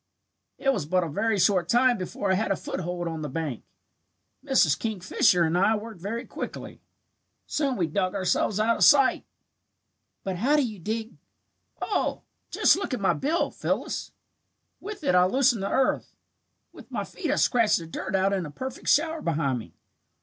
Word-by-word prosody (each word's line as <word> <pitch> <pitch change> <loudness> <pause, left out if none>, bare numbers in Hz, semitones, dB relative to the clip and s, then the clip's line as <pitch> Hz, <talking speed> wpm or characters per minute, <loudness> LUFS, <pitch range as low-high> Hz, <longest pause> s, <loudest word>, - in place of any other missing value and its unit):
"It 270 -1 +1
was 175 - -3
but 180 +2 +2
a - - -3
very 220 +8 0
short 185 -2 +2
time 245 +1 +4
before 190 +2 -2
I - - +4
had 210 +4 0
a 195 - +2
foothold 175 -1 -4
on 165 -1 -4
the 150 - -4
bank. 145 -4 -4 0.8
Mrs. 265 - +3
Kingfisher 185 -4 +2
and 165 +1 +1
I 195 +5 +3
worked 215 -3 -8
very 230 +6 -4
quickly. - - -7 0.6
Soon 280 -4 -1
we 175 - +1
dug 185 +4 -1
ourselves 195 +2 0
out 230 +2 +2
of - - +2
sight." 275 -2 +5 1.0
"But 190 -2 -3
how 265 +10 +2
do 295 - +3
you 215 -3 -8
dig 220 +4 -4 0.3
" - - -44
"Oh, - - -1 0.3
just - - +4
look 375 -9 -2
at - - -6
my 195 - +2
bill, 315 +5 0
Phyllis. - - -3 0.7
With 410 -3 -8
it 230 - +2
I 180 0 +5
loosen 255 +1 +2
the 195 - -2
earth. 265 - 0 0.6
With - - -14
my - - -3
feet 340 -6 -6
I 290 - +2
scratch 235 -7 +3
the 165 - -6
dirt 190 +4 -4
out 190 +1 +2
in 185 -5 -1
a - - -9
perfect 260 - -7
shower 320 +1 +2
behind 145 -6 0
me. 85 -7 -12
200 Hz, 185 wpm, -26 LUFS, 175-255 Hz, 1.0 s, sight